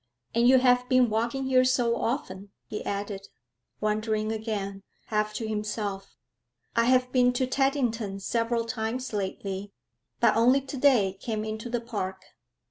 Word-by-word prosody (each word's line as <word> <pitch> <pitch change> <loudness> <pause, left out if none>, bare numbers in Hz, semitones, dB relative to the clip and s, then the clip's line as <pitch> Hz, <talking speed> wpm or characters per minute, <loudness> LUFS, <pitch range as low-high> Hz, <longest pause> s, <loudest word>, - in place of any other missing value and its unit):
And 235 +1 +4
you 260 +1 +7
have 250 -1 +3
been 255 -3 +4
walking 235 +5 0
here 260 -1 +4
so 245 -2 +2
often,' 200 -6 -3 0.2
he 210 - -5
added, 200 -1 -4 0.5
wondering 215 0 0
again, 210 -3 -3 0.2
half 215 -1 0
to 225 - -3
himself. 210 -2 -4 0.6
'I 230 0 +4
have 250 0 +3
been 250 -1 +4
to 255 +1 +1
Teddington 250 -6 0
several 230 +3 0
times 230 +2 -3
lately, 195 0 -4 0.5
but - - +4
only 250 +4 +4
today 255 -8 +2
came 215 -2 -3
into 220 +2 -5
the 240 0 -1
park.' 190 -5 -5
225 Hz, 140 wpm, -27 LUFS, 210-250 Hz, 0.6 s, you